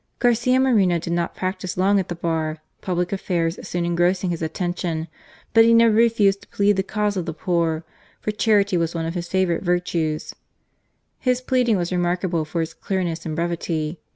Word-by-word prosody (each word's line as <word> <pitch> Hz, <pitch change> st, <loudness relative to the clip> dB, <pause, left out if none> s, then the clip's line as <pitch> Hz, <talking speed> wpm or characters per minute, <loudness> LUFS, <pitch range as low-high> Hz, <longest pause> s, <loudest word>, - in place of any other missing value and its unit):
Garcia 245 Hz, +1 st, +3 dB
Moreno 210 Hz, -10 st, +3 dB
did 170 Hz, +1 st, -3 dB
not 170 Hz, 0 st, -1 dB
practise 185 Hz, -1 st, -4 dB
long 195 Hz, +2 st, +3 dB
at 190 Hz, -, -2 dB
the 175 Hz, -, -4 dB
Bar, 160 Hz, -2 st, -2 dB, 0.2 s
public 180 Hz, 0 st, -1 dB
affairs 170 Hz, -3 st, -1 dB
soon 175 Hz, -1 st, -3 dB
engrossing 175 Hz, +2 st, +1 dB
his 170 Hz, -, -4 dB
attention; 165 Hz, 0 st, -2 dB, 0.5 s
but 225 Hz, -, +7 dB
he 230 Hz, 0 st, +5 dB
never 230 Hz, -1 st, +6 dB
refused 215 Hz, -3 st, +3 dB
to -, -, -17 dB
plead 200 Hz, 0 st, +2 dB
the -, -, +3 dB
cause 205 Hz, +1 st, -1 dB
of 180 Hz, -2 st, -3 dB
the 160 Hz, -, -4 dB
poor, 165 Hz, -1 st, 0 dB, 0.4 s
for 215 Hz, -, -2 dB
charity 210 Hz, -2 st, +2 dB
was 170 Hz, 0 st, -1 dB
one 165 Hz, -1 st, -2 dB
of 165 Hz, -, -3 dB
his 175 Hz, -1 st, -4 dB
favourite 185 Hz, -3 st, +1 dB
virtues. 175 Hz, -4 st, -1 dB, 0.9 s
His 250 Hz, -1 st, +1 dB
pleading 250 Hz, -4 st, +1 dB
was 175 Hz, -1 st, -2 dB
remarkable 175 Hz, -2 st, 0 dB
for 165 Hz, +1 st, -2 dB
its 160 Hz, 0 st, -7 dB
clearness 170 Hz, -3 st, -3 dB
and 155 Hz, -, -3 dB
brevity. 165 Hz, -1 st, -2 dB
180 Hz, 180 wpm, -22 LUFS, 170-200 Hz, 0.9 s, but